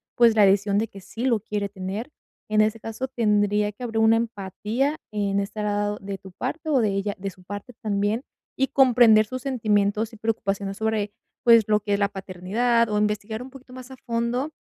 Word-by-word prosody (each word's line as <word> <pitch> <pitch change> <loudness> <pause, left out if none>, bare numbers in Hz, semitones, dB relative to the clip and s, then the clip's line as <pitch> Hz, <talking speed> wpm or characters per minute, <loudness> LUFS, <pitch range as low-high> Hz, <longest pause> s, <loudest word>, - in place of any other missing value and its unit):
pues, 235 -2 +5
la 210 -2 +6
decisión 200 +1 +3
de 225 +2 +1
que 195 - -12
sí 225 +5 -6
lo 235 -4 +3
quiere 210 -1 -3
tener. 195 +5 -5 0.4
En 215 0 +2
ese 215 +1 +1
caso, 225 +4 -5
tendría 210 -4 +1
que 230 - -10
haber 225 -2 -3
una 220 +1 +5
empatía 230 +5 -2
en 200 -1 0
estar 210 +1 -4
a 205 -1 0
lado 205 0 -1
de 195 0 -5
tu 190 0 -13
parte 315 - -4
o 280 -4 +3
de 220 -3 +2
ella 195 +1 -2
de 195 +1 -4
su 185 - -19
parte 205 +6 -8
también, 210 +2 0 0.3
y 270 - +2
comprender 240 -5 +5
sus 255 +4 -6
sentimientos 215 -4 +1
y - - -11
preocupaciones 200 -3 -2
sobre, 220 -2 -1 0.3
pues, 230 -2 +7
lo 210 0 +4
que 205 0 -2
es 200 - +1
la 200 -1 +2
paternidad, 205 +5 0
o 210 - 0
investigar 210 +1 -1
un 255 - -8
poquito 265 -1 -15
más 255 0 -10
a - - -8
fondo 235 +5 -1
215 Hz, 210 wpm, -24 LUFS, 200-235 Hz, 0.4 s, pues